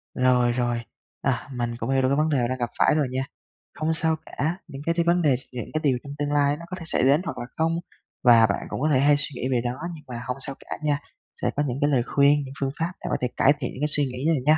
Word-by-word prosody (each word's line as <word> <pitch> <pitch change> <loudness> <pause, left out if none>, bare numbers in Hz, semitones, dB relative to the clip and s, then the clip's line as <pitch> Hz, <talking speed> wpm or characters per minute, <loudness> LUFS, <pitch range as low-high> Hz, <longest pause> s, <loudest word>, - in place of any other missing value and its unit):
Rồi, 125 -1 +3
rồi, 120 -1 0 0.4
à, 130 -2 -1
mình 120 -1 -2
cũng 120 +1 -4
hiểu 135 0 +3
được 130 - +3
cái 140 - +3
vấn 155 +1 +2
đề 145 - +2
đang 130 +1 -2
gặp 120 -2 -2
phải - - +5
rồi 150 -3 +2
nha. 130 +1 -1 0.6
Hông 155 +1 +1
sao 160 0 +1
cả, 160 +6 -2
những 140 -3 -8
cái 165 - +2
thi 170 - +2
vấn 170 +1 +3
đề 145 -5 +4 0.2
những 125 -3 -6
cái 155 - 0
điều 135 -4 +3
trong 140 - -7
tương 145 0 -1
lai 145 0 +2
nó 170 - -9
có 185 - -4
thể - - -7
xảy 160 - +2
đến 140 +5 +5
hoặc - - -4
là - - -4
không, 165 +1 +2 0.5
và 120 -3 +7
bạn 100 -2 -1
cũng - - -4
có 155 - +2
thể 135 -4 +4
hay 145 +1 +5
suy 145 0 -3
nghĩ 130 - 0
về 125 -2 +2
đó, 120 0 -3
nhưng 150 - -11
mà 120 -1 -6
hông 125 +1 -2
sao 135 0 -5
cả - - -3
nha, 145 -1 +1 0.4
sẽ - - +1
có 145 - +1
những 125 0 -2
cái 145 - +3
lời 130 -5 +2
khuyên, 140 +3 +4
những 130 - -8
phương 135 -1 0
pháp 165 +2 0
để - - -3
có - - +1
thể 125 - +2
cải 140 - +6
thiện 125 - -3
những 135 - -8
cái 150 - +2
suy 145 -1 0
nghĩ 125 +2 -5
này 165 -2 +3
nha. 155 +1 +6
140 Hz, 300 wpm, -25 LUFS, 125-150 Hz, 0.6 s, và